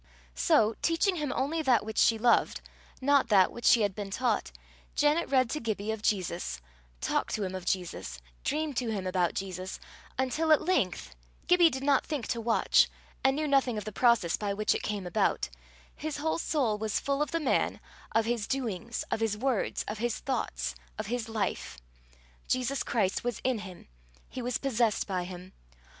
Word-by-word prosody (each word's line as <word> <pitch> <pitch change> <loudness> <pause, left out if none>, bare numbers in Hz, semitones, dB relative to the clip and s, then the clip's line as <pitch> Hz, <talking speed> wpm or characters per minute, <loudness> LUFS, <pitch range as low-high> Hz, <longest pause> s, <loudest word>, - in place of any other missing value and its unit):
So, 65 - +3
teaching 350 +3 +2
him 295 -4 -2
only 315 +5 0
that 255 -7 +3
which 220 0 -2
she 225 - +5
loved, 235 +2 +3 0.4
not 280 0 +4
that 195 -4 +5
which 240 - -8
she 235 - +6
had 200 -2 +1
been 205 0 -5
taught, 245 +5 0 0.4
Janet 300 +3 +2
read 260 -2 +4
to 305 - -1
Gibbie 220 -3 -2
of 220 -1 -4
Jesus, 180 - -1 0.4
talked - - 0
to 215 - -2
him 185 -1 -3
of 185 -1 -6
Jesus, 175 - -2 0.3
dreamed 305 -1 -1
to 240 -2 0
him 200 -4 -2
about 180 -2 0
Jesus; 185 -1 -5 0.4
until 265 +5 +1
at 310 - +5
length 185 - 0 0.3
Gibbie 355 -2 +6
did 265 -2 -5
not 275 -1 +3
think 290 -7 -3
to 235 - -1
watch, 230 0 +4 0.3
and 270 0 +4
knew 305 +1 -1
nothing 270 -5 +2
of 210 - -4
the 215 - -4
process 235 -7 +3
by 200 -1 -2
which 215 +1 +2
it - - -2
came 205 -3 -3
about 175 - +1 0.5
his 310 0 -4
whole 320 +3 -1
soul 255 -11 0
was 215 -1 0
full 280 +1 -1
of 300 - 0
the 330 - -1
man, 305 - +1 0.3
of 225 0 +2
his 230 -3 -1
doings, 235 -3 -2
of - - 0
his 220 -2 0
words, 255 -1 -1
of 210 +1 -4
his 240 0 -1
thoughts, 65 - -2 0.2
of - - -3
his 235 0 -3
life. 215 - -2 0.7
Jesus 255 +2 0
Christ 200 -5 0
was 240 -2 -2
in 255 -3 +1
him 190 -4 -10 0.4
he 255 - -6
was 245 0 -1
possessed 235 -5 +1
by 185 -3 -2
him. 180 0 -9
230 Hz, 185 wpm, -29 LUFS, 200-275 Hz, 0.7 s, she